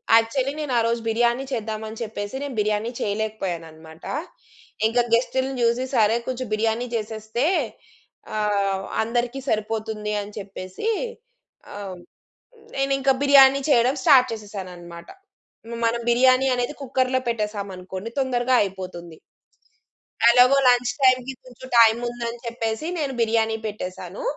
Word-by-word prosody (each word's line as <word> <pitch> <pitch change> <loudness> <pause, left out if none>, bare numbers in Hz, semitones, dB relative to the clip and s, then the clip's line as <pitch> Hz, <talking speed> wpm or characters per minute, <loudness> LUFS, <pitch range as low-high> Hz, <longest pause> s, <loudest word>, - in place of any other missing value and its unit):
Actually 255 +4 +2
నేను 295 -4 -3
ఆ - - +5
రోజు 235 0 -1
బిర్యానీ 235 +3 +1
చేద్దాం 220 -3 -3
అని 220 - -8
చెప్పేసి 210 -1 -5
నేను 275 -4 -5
బిర్యానీ 210 +2 0
చేయలేకపోయానన్నమాట. 175 -7 -4 0.8
ఇంక 240 +2 +1
గెస్ట్‌ని 260 +3 +1
చూసి, 235 +2 +2
సరే, 220 -1 +4
కొంచెం 255 0 -3
బిర్యానీ 225 +3 0
చేసేస్తే 220 +3 -2 0.9
ఆహ్, 200 -2 0 0.2
అందరికీ 240 +3 -1
సరిపోతుంది 215 0 -2
అని 205 +1 -8
చెప్పేసి 195 - -7 0.9
ఆహ్, 195 -3 -7 0.8
నేనింక 275 0 +1
బిర్యానీ 275 -1 +7
చేయడం 250 0 +4
స్టార్ట్ 255 -3 +6
చేసేశానన్నమాట. 180 -5 -8 0.8
మనం 230 +1 +1
బిర్యానీ 255 +2 +4
అనేది 245 +4 -2
కుక్కర్‌లో 260 0 0
పెట్టేసామనుకోండి 200 -3 -4
తొందరగా 255 -1 +2
అయిపోతుంది. 185 -4 -6 1.2
ఎలాగో 250 +3 +6
లంచ్ 245 0 +4
టైమ్‌కి 255 0 +3
కొంచెం 255 0 -12
టైమ్ 230 0 +6
ఉందని 235 0 -5
చెప్పేసి 230 +5 -3
నేను 285 -4 -2
బిర్యానీ 225 -1 +1
పెట్టేసాను. 210 - -6
230 Hz, 115 wpm, -23 LUFS, 210-255 Hz, 1.2 s, బిర్యానీ